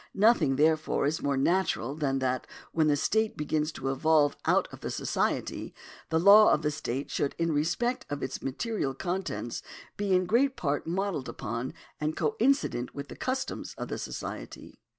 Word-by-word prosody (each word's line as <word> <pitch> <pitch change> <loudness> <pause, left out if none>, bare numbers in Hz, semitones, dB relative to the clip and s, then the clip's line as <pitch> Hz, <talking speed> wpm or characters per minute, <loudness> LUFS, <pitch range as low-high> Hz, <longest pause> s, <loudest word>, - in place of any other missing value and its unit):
Nothing, 210 - +4
therefore, 155 +1 +2
is 150 +3 0
more 140 -1 0
natural 140 -4 +1
than 140 -3 0
that, 130 -1 -1 0.2
when 160 -2 +2
the 145 - +4
state 220 +9 +1
begins 150 +1 0
to 135 0 -2
evolve 150 +1 +3
out - - +3
of - - -10
the - - -4
society, - - -2 0.3
the 160 - +2
law 200 +4 +8
of 150 - +2
the 150 - +1
state 140 -2 -4
should 140 - -1
in 165 0 +1
respect 170 +12 0
of 145 -1 -4
its 130 - -4
material 135 - -2
contents 175 -7 -3 0.4
be 200 -2 0
in 185 0 +2
great 255 +7 +2
part 145 -1 -1
modelled 185 -5 -2
upon 120 +4 -4 0.2
and 155 +1 -2
coincident 275 - +1
with 140 0 -6
the - - -8
customs 260 +1 -3
of - - -5
the - - -3
society. - - -7
155 Hz, 170 wpm, -29 LUFS, 140-195 Hz, 0.4 s, law